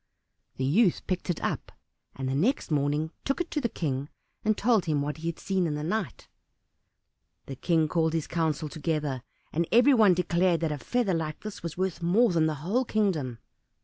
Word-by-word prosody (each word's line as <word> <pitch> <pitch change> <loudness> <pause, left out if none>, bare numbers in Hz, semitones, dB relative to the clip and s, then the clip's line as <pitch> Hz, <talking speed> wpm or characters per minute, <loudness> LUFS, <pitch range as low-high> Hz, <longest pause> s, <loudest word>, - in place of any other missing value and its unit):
The 130 - -2
youth 180 - +3
picked 185 0 -3
it 175 - 0
up, - - -2 0.4
and 135 -1 -4
the 130 - -1
next 180 - +1
morning 150 +2 +1
took 275 - -1
it 350 - -3
to 300 - -1
the 235 - 0
King 140 -5 -3 0.3
and 215 -1 +2
told 225 -3 +3
him 150 -3 +1
what 150 +2 -3
he 165 +1 -5
had 170 - -2
seen 190 -3 0
in 150 - -2
the 150 - -4
night. 195 +1 -3 1.2
The 135 - -6
King 160 +3 +2
called 160 0 +1
his 160 -2 0
council 160 -2 -1
together, 150 -4 -2 0.3
and 170 +1 0
everyone 230 -6 +6
declared 175 0 +2
that 160 -2 0
a 150 - -3
feather 240 - 0
like 160 -2 -3
this 215 -1 -7
was 165 -1 -6
worth 185 -2 -1
more 200 +7 +4
than 160 -2 +3
the 155 - -1
whole 235 +8 +2
kingdom. 180 - 0
170 Hz, 195 wpm, -28 LUFS, 150-200 Hz, 1.2 s, everyone